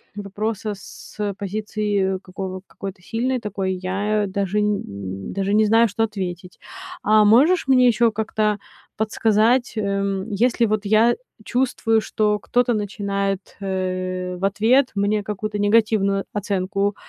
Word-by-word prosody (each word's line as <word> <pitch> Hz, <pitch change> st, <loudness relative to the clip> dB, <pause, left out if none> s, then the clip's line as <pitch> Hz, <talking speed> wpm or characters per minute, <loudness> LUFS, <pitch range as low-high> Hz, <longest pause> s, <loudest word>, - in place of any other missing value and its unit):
вопроса 210 Hz, +1 st, -3 dB
с, 195 Hz, -, -13 dB
э, 205 Hz, -1 st, -1 dB
позиции 205 Hz, -1 st, -1 dB
какого 185 Hz, 0 st, -6 dB
какой-то 195 Hz, -1 st, -8 dB
сильной 250 Hz, +7 st, -1 dB
такой 195 Hz, -4 st, -2 dB
я 200 Hz, +3 st, -1 dB
даже 200 Hz, +1 st, -1 dB
м, 100 Hz, -, -3 dB
даже 195 Hz, +1 st, -1 dB
не 215 Hz, +1 st, +4 dB
знаю, 225 Hz, +2 st, +5 dB
что 215 Hz, +2 st, -1 dB
ответить. 185 Hz, -4 st, -5 dB, 0.4 s
А 215 Hz, 0 st, +5 dB
можешь 270 Hz, -, +5 dB
мне 255 Hz, -2 st, +5 dB
ещё 235 Hz, -1 st, +3 dB
как-то 215 Hz, -1 st, -1 dB, 0.4 s
подсказать, 220 Hz, +3 st, +2 dB
эм, 200 Hz, 0 st, -1 dB
если 235 Hz, +3 st, +2 dB
вот 215 Hz, -1 st, -1 dB
я 220 Hz, +3 st, +4 dB, 0.3 s
чувствую, 240 Hz, -3 st, +1 dB
что 210 Hz, -1 st, 0 dB
кто-то 245 Hz, +1 st, +1 dB
начинает, 200 Hz, -2 st, -2 dB
э, 185 Hz, -1 st, -2 dB
в 190 Hz, -, -10 dB
ответ 235 Hz, +7 st, +3 dB
мне 205 Hz, +1 st, +1 dB
какую-то 210 Hz, +1 st, -4 dB
негативную 205 Hz, -2 st, +2 dB
оценку, 200 Hz, 0 st, -1 dB
205 Hz, 130 wpm, -22 LUFS, 195-220 Hz, 0.4 s, знаю